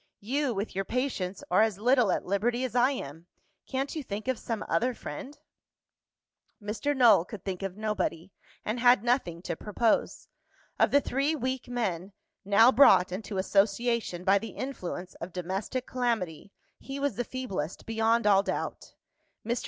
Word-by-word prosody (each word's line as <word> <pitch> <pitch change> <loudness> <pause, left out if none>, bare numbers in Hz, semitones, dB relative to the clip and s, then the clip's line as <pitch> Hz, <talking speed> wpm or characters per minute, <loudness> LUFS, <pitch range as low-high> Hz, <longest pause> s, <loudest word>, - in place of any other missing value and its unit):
You, 260 +3 -1
with 200 +3 -3
your 195 - 0
patients, 200 -6 -2
are 185 - +5
as 220 -3 +2
little 240 -1 +3
at - - -1
liberty 235 +6 0
as 255 - -3
I 250 +1 +4
am. 165 - -6 0.4
Can't 270 +4 -3
you 310 - -2
think 215 -3 -6
of 260 -3 0
some 225 -3 -4
other 245 +2 +1
friend?" 290 0 -8 1.2
Mr. 220 +7 -2
Null 225 -9 +6
could 195 +1 -10
think 190 -1 -4
of 195 0 -4
nobody, 210 -5 -2 0.3
and 220 +3 -2
had 245 -3 +5
nothing 235 -9 0
to - - -3
propose. 215 +5 0 0.5
Of - - +5
the 285 - +4
three 275 +5 0
weak 260 -2 -3
men, 200 -6 -3 0.3
now 215 +5 +6
brought 225 -10 +6
into 200 +1 -5
association 200 0 +1
by 195 +1 +4
the 225 - -8
influence 185 -9 -5
of 170 +1 -6
domestic 190 +8 -3
calamity, 220 -9 -2 0.3
he 275 +1 -7
was 285 0 -1
the 245 - -1
feeblest, 220 -11 -5
beyond 225 +1 +1
all 200 -2 +6
doubt. - - -4 0.5
Mr. 235 +1 0
220 Hz, 160 wpm, -28 LUFS, 195-255 Hz, 1.2 s, Null